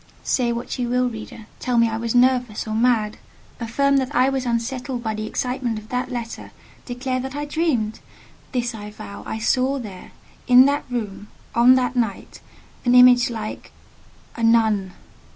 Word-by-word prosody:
Say 245 -2 +1
what 235 +2 -4
you 240 -1 -1
will, 250 +1 +2
reader—tell 230 +2 -5
me 230 0 +5
I 220 - -3
was 230 +1 -2
nervous 245 -3 +2
or 215 - -3
mad; 220 -2 +1 0.4
affirm 275 +4 +1
that 260 -2 -1
I 255 +2 +4
was 265 -2 -2
unsettled 245 +1 -2
by 220 -1 -1
the 215 0 -4
excitement 250 -1 -2
of 215 +1 -10
that 250 +1 -2
letter; 235 -2 -6 0.4
declare 255 +1 -2
that 265 +2 -5
I 295 0 -3
dreamed; 290 -9 -1 0.5
this 240 -2 -1
I 210 -1 -8
vow—I 210 +1 -7
saw 255 +4 +1
there—in 245 +3 +1
that 285 +1 0
room—on 235 +2 +1
that 255 0 0
night—an 245 +2 -3
image 250 -1 +7
like—a 225 +1 -10
NUN. 220 -5 +3
245 Hz, 150 wpm, -22 LUFS, 220-255 Hz, 0.5 s, image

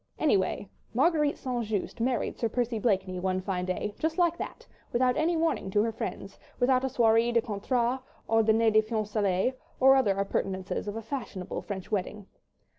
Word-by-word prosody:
Anyway, 200 -8 +1 0.3
Marguerite 300 +2 +3
St. 245 -2 -2
Just 215 +1 -3
married 245 0 0
Sir 230 - 0
Percy 240 -1 -1
Blakeney 190 -4 0
one 185 0 0
fine 185 -1 -2
day, 185 +3 -2
just 320 +1 -1
like 345 -2 +3
that, - - -6 0.3
without 250 +1 +2
any 330 +2 +1
warning 320 -11 0
to 205 +2 +2
her 230 - 0
friends, 225 - -6 0.2
without 255 0 +3
a - - +1
soirée 230 -1 +3
de 235 - +4
contrat 235 +4 -1 0.3
or 225 0 +4
dîner 220 0 +3
de 215 - +6
fiançailles 215 -1 0 0.3
or 265 +1 +7
other 205 -8 +2
appurtenances 195 0 -2
of 205 - -3
a 225 - -5
fashionable 225 -6 -5
French 195 -1 -6
wedding. 205 0 -2
225 Hz, 175 wpm, -28 LUFS, 200-255 Hz, 0.3 s, or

